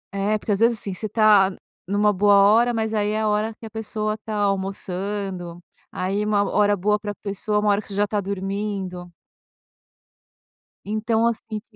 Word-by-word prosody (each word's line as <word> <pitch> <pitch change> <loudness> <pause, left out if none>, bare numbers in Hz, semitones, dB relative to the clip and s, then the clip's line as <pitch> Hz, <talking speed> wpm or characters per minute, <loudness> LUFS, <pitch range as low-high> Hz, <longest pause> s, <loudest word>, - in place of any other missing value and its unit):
É 205 +2 +1
porque, 210 - -4
às 200 - +1
vezes, 230 0 +3
assim, 200 -2 -3
você 215 +3 -5
tá 210 -3 +5 0.4
numa 210 +1 +2
boa 205 +1 +4
hora, 220 +5 +5
mas 220 -1 -2
,aí, 210 -1 +1
é 215 +1 -1
a 215 - +1
hora 210 +1 0
que 225 - -10
a - - -7
pessoa 215 -1 -3
tá 215 -1 -5
almoçando, 195 -2 -3 0.3
aí, 195 +3 -2
uma 210 -1 +2
hora 205 0 +2
boa 210 +3 +1
pra 205 -1 -5
pessoa, 210 +1 -2
uma 210 - +1
hora 205 +1 +2
que - - -13
você 200 - -6
já 205 - +2
está 205 0 -1
dormindo. 195 -2 -4 1.7
Então, 220 +2 0
assim. 225 -2 -3
205 Hz, 180 wpm, -23 LUFS, 195-215 Hz, 1.7 s, tá